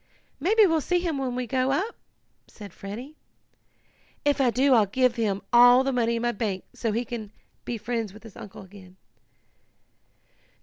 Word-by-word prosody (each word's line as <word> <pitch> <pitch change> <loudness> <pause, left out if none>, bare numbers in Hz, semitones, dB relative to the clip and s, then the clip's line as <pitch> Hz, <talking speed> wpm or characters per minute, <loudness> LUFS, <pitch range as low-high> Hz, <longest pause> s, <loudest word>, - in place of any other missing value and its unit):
"Maybe 420 +8 +4
we'll 325 -4 +2
see 360 +5 0
him 335 -5 -2
when 255 -2 -2
we 250 0 -2
go 255 +2 0
up," 390 +11 -1 0.5
said 205 -4 -12
Freddie. 240 +10 -8 1.1
"If 285 -1 +2
I 255 - +4
do 260 +3 +3
I'll 220 -4 +4
give 255 +4 +1
him 205 -4 -1
all 245 +2 +7
the 270 0 -1
money 235 -1 +1
in 230 - -3
my 240 - +1
bank 200 -4 -3
so 225 - -2
he 235 +3 -1
can 220 -3 -6 0.3
be 240 - -3
friends 225 -1 -3
with 215 +3 -15
his 225 -3 -13
uncle 195 - -10
again." 190 -1 -15
240 Hz, 175 wpm, -26 LUFS, 215-270 Hz, 1.1 s, all